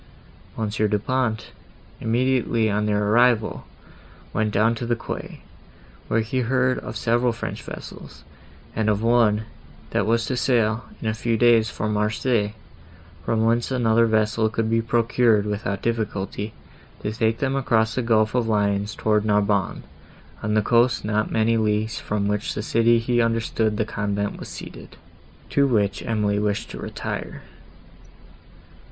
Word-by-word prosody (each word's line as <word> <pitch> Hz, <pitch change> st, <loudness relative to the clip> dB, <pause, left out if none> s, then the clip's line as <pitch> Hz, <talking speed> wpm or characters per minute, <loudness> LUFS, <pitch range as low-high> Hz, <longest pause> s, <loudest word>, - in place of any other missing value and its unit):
Monsieur 110 Hz, -1 st, 0 dB
Du 105 Hz, 0 st, +1 dB
Pont, 110 Hz, 0 st, -2 dB, 0.5 s
immediately 115 Hz, -2 st, +1 dB
on 105 Hz, +1 st, 0 dB
their 105 Hz, 0 st, +1 dB
arrival, 120 Hz, -1 st, +2 dB, 0.7 s
went 110 Hz, -1 st, 0 dB
down 110 Hz, +3 st, +3 dB
to 115 Hz, -, -6 dB
the 120 Hz, -, +1 dB
quay, 115 Hz, -, -7 dB, 0.7 s
where 115 Hz, -, +1 dB
he 115 Hz, +4 st, -2 dB
heard 130 Hz, +1 st, +1 dB
of -, -, -6 dB
several 120 Hz, +1 st, +1 dB
French 115 Hz, -, -5 dB
vessels, -, -, -10 dB, 0.5 s
and 110 Hz, 0 st, +1 dB
of 105 Hz, +1 st, 0 dB
one, 115 Hz, -2 st, +3 dB, 0.5 s
that 100 Hz, -, 0 dB
was 115 Hz, 0 st, +2 dB
to 130 Hz, -, -2 dB
sail, 115 Hz, -3 st, +1 dB, 0.2 s
in -, -, -2 dB
a 110 Hz, -, +1 dB
few 115 Hz, 0 st, -1 dB
days, 115 Hz, -1 st, +4 dB
for 110 Hz, -, -3 dB
Marseilles, 105 Hz, +1 st, 0 dB, 0.7 s
from 110 Hz, +5 st, +1 dB
whence 115 Hz, +1 st, +1 dB
another 115 Hz, -3 st, +3 dB
vessel 110 Hz, 0 st, +1 dB
could 115 Hz, 0 st, -1 dB
be 115 Hz, 0 st, +3 dB
procured, 115 Hz, -2 st, +2 dB
without 100 Hz, -1 st, -3 dB
difficulty, 105 Hz, -2 st, -2 dB, 0.5 s
to 105 Hz, -, -1 dB
take 110 Hz, 0 st, 0 dB
them 135 Hz, -1 st, -1 dB
across 110 Hz, -5 st, +1 dB
the 130 Hz, -, -1 dB
gulf 110 Hz, -2 st, +2 dB
of 125 Hz, -2 st, +1 dB
Lyons 105 Hz, -1 st, 0 dB
towards 105 Hz, -1 st, +1 dB
Narbonne, 105 Hz, -2 st, +1 dB, 0.6 s
on 105 Hz, 0 st, -1 dB
the 110 Hz, -, +3 dB
coast 120 Hz, +2 st, +2 dB
not 105 Hz, 0 st, 0 dB
many 115 Hz, +1 st, +2 dB
leagues 110 Hz, 0 st, 0 dB
from 105 Hz, -1 st, -2 dB
which 105 Hz, 0 st, -1 dB
city 115 Hz, +2 st, +2 dB
he 120 Hz, +1 st, +1 dB
understood 115 Hz, -2 st, 0 dB
the 110 Hz, -, 0 dB
convent 100 Hz, -1 st, -3 dB
was -, -, -8 dB
seated, -, -, -10 dB, 0.5 s
to 140 Hz, 0 st, +3 dB
which 105 Hz, -6 st, +1 dB
Emily 105 Hz, -3 st, +1 dB
wished 105 Hz, -1 st, -2 dB
to -, -, -7 dB
retire. -, -, -5 dB
110 Hz, 150 wpm, -23 LUFS, 105-115 Hz, 0.7 s, days